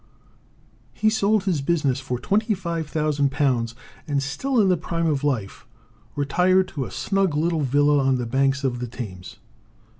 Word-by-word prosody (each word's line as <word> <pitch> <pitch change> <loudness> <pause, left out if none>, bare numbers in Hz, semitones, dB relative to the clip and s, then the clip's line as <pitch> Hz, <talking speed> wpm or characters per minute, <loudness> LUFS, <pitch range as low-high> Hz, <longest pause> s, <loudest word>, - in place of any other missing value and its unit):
He 215 - +2
sold 215 -1 +2
his 180 -7 0
business 140 -4 +1
for 130 -2 -3
£25,000, 150 - 0 0.3
and, 140 -2 0
still 235 - -1
in 205 - +4
the 180 - +4
prime 165 0 -3
of 145 -3 0
life, 120 -9 -2 0.5
retired 180 +7 +2
to 140 -4 -4
a - - -8
snug 195 -5 0
little 160 +1 +1
villa 145 +2 +3
on 135 -1 +2
the 125 - -3
banks 135 +3 +1
of 125 -2 -1
the 125 - -4
Thames. 105 -7 -8
145 Hz, 150 wpm, -23 LUFS, 135-175 Hz, 0.5 s, in